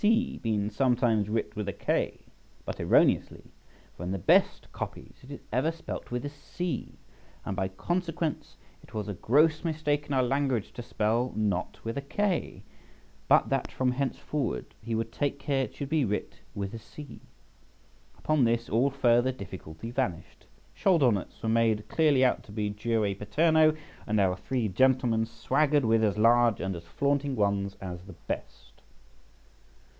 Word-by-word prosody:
C. 225 +3 +2
been 105 -2 -1
sometimes 115 -3 +2
writ 105 -1 -2
with 105 -2 -3
a - - -3
K, - - -1 0.4
but - - -5
erroneously, - - +2 0.4
for - - -12
in 90 - -3
the 95 - -1
best 85 - +2
copies - - -7
it 130 - -15
is 140 - -8
ever 135 +7 +2
spelt 165 - -7
with 125 +3 -3
a - - -2
C; 155 +4 -5 0.5
and 100 - -3
by 95 0 0
consequence 170 - -3 0.2
it - - -16
was 105 -2 -3
a 105 - -3
gross 155 - +3
mistake 150 -3 -1
in 145 - -3
our 130 -1 +3
language 130 -3 0
to - - -6
spell 115 +2 0
'knot' 100 -4 -1
with 115 +4 -3
a - - -4
K," 175 - -2 0.6
but - - +5
that - - -1
from 130 -1 +1
henceforward 135 - -3
he 115 +1 -3
would 115 0 -2
take 140 +2 -1
care 135 -1 0
it 105 - -13
should 140 - -5
be 155 -2 +2
writ 105 -3 -3 0.2
with 100 0 -4
a 115 - -6
C. 145 +6 -11 1.0
Upon 155 -3 +2
this 115 0 +1
all 120 +5 +3
further 125 -2 +3
difficulty 95 -3 -8
vanished; 120 -10 -3 0.3
shoulder 165 -10 +4
knots 100 -3 -4
were - - -1
made 110 -2 +2
clearly 145 -5 +4
out 125 - +2
to - - -13
be 105 -1 -2
jure 105 -1 0
paterno, 155 - +3 0.3
and 110 -1 +1
our 95 -2 +3
three 120 +4 -2
gentlemen 120 +1 +2
swaggered 140 +5 +1
with 110 0 +3
as 105 -2 +1
large 115 0 +4
and 95 -1 -2
as 85 0 -9
flaunting 140 - 0
ones 100 -2 0
as 90 -2 -6
the 100 - -10
best. - - -6
120 Hz, 170 wpm, -28 LUFS, 105-140 Hz, 1.0 s, but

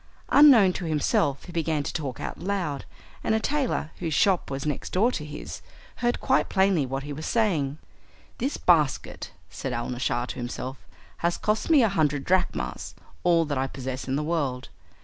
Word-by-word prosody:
Unknown 245 -11 +7
to 175 - -4
himself 145 -3 +1
he 180 - -10
began 160 -3 0
to - - -4
talk 140 -7 -4
out - - -5
loud, 175 -7 -2 0.4
and 220 - +2
a - - +2
tailor, 270 - -1
whose 165 -4 -2
shop 195 -2 +3
was 135 0 -4
next 150 -2 -3
door 220 +7 +3
to 155 - -4
his, 150 - -7 0.4
heard 240 0 0
quite 265 - +2
plainly 190 -7 +2
what 135 +1 -3
he 145 0 -5
was 155 +3 -5
saying. 165 - +1 0.6
"This 270 +4 -1
basket," 155 -7 +1 0.2
said 130 - -4
Alnaschar 120 0 -1
to - - -5
himself, 125 +2 -5 0.4
"has 170 0 0
cost 215 +6 -1
me 300 -6 +6
a - - +5
hundred 150 -7 +1
drachmas 185 +3 -1 0.3
all 170 -2 +4
that 145 -3 -2
I 135 - 0
possess 130 -1 -5
in 130 - 0
the 150 - 0
world. 145 -6 -2
155 Hz, 180 wpm, -26 LUFS, 135-195 Hz, 0.6 s, Unknown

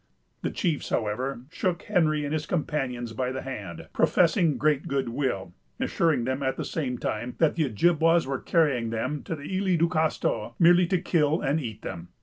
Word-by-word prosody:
The - - -1
chiefs, 165 -6 -1
however, 120 +4 -1
shook 175 -1 -1
Henry 155 -3 +2
and 145 - -3
his 155 -1 -2
companions 130 -8 -2
by 125 +2 -2
the 130 - -4
hand, 90 -11 -7
professing 170 -3 +3
great 150 -2 +1
good 135 -3 -1
will, 115 -9 -2 0.3
assuring 160 -7 +1
them, 130 +3 -2
at 130 -1 -1
the - - -3
same 130 -6 -2
time, 120 +2 -3
that 160 -2 +3
the 160 -2 +1
Ojibwas 165 +7 +3
were 135 -1 -2
carrying 140 -9 +2
them 130 +6 -2
to 165 - -4
the 145 - -10
Isles 185 -2 +2
du 165 +1 +3
Castor 160 -2 0
merely 175 +1 +6
to 185 - +2
kill 160 -3 +1
and 145 +3 +1
eat 110 -7 -6
them. 85 +1 -6
145 Hz, 185 wpm, -27 LUFS, 125-165 Hz, 0.3 s, merely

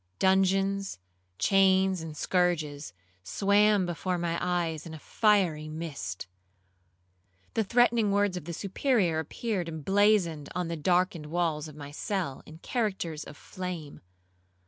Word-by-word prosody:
Dungeons, 195 +1 +2 0.4
chains, 190 -2 +3
and 160 -2 -7
scourges, 160 -6 0 0.3
swam 200 - +3
before 175 +1 -2
my 170 -1 -1
eyes 170 -3 -1
in 160 - -8
a - - -7
fiery 175 -5 +1
mist. 140 - -5 1.3
The 225 - +1
threatening 230 -1 +3
words 200 -1 +2
of 180 - -6
the 170 - -5
Superior 195 - +1
appeared 180 +2 -3
emblazoned 170 -1 +2
on 180 -2 -2
the 170 - -2
darkened 175 0 +1
walls 160 -2 -1
of 155 - -11
my 145 -1 -9
cell 170 -3 -3
in 155 - -11
characters 190 - -2
of 145 - -11
flame. 180 -6 -7
180 Hz, 125 wpm, -28 LUFS, 160-195 Hz, 1.3 s, chains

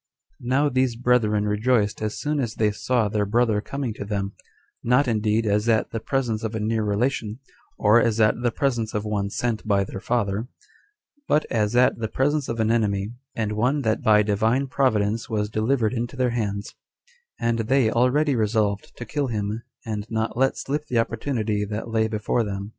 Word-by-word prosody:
1. 120 - -7
Now 140 +3 +3
these 130 -3 +1
brethren 115 -4 +2
rejoiced 105 0 +1
as 110 -1 -3
soon 150 0 -1
as 115 -5 -2
they 105 -1 +2
saw 115 +1 0
their 105 0 -1
brother 110 -1 +2
coming 135 -1 -4
to 105 - -6
them, 100 -1 -3 0.5
not 125 +4 +3
indeed 110 0 +1
as 105 +2 +1
at 110 -1 +2
the 115 - -3
presence 115 -2 -1
of 110 0 -3
a - - -1
near 110 +1 0
relation, 110 +1 -1 0.4
or 110 +3 +5
as 115 -1 +1
at 110 +2 +3
the 120 - +2
presence 120 -4 -1
of 105 0 -1
one 100 -2 -1
sent 110 0 -2
by 100 -2 +3
their 95 - -7
father, 110 0 -1 0.8
but 150 - +2
as 110 -1 +1
at 125 -1 +4
the 110 - -1
presence 145 +4 0
of 115 - -3
an 110 0 +2
enemy, 105 -3 0 0.2
and 110 -2 -1
one 125 +7 +1
that 110 -1 0
by 105 -1 +5
Divine 110 +6 +1
Providence 115 -5 0
was 105 -2 -1
delivered 110 +1 +1
into 120 +2 -3
their 130 -2 +1
hands; 105 -3 -3 0.7
and 115 0 0
they 115 0 +2
already 130 +5 +2
resolved 105 -2 0
to 120 - -6
kill 145 0 -2
him, 105 -1 -3 0.2
and 105 -2 -4
not 110 0 -2
let 135 +2 +2
slip 145 +2 -3
the 120 - -1
opportunity 115 -2 -1
that 105 +2 -4
lay 110 -1 +1
before 110 +2 0
them. 100 -1 -5
110 Hz, 190 wpm, -24 LUFS, 105-125 Hz, 0.8 s, or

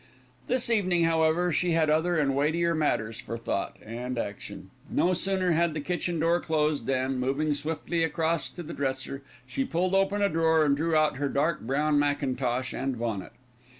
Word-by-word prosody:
This 245 -1 +2
evening, 185 -6 +2
however, 165 +1 +2
she 175 +2 +1
had 160 -1 +3
other 160 +3 +2
and 140 -3 +1
weightier 165 +4 +1
matters 115 -8 -1
for 115 - -5
thought 115 -4 -3
and 120 +3 -5
action. 105 -3 -6 0.2
No 180 - +2
sooner 185 0 0
had 165 -1 +2
the - - -1
kitchen 175 +2 -2
door 165 +2 +2
closed 150 -6 0
than, 130 0 0
moving 140 +4 0
swiftly 160 +3 -2
across 165 0 0
to 175 - -8
the 170 - -7
dresser, 135 0 -3 0.2
she 270 - -2
pulled 185 -5 -1
open 195 +1 +2
a - - +5
drawer, 160 -2 +3
and 140 -1 +3
drew 160 +2 0
out 155 -2 +3
her 140 0 -1
dark 150 +3 +1
brown 145 +5 +1
mackintosh 130 -3 -1
and 135 -1 -2
bonnet. 115 -5 -4
155 Hz, 180 wpm, -27 LUFS, 135-170 Hz, 0.2 s, a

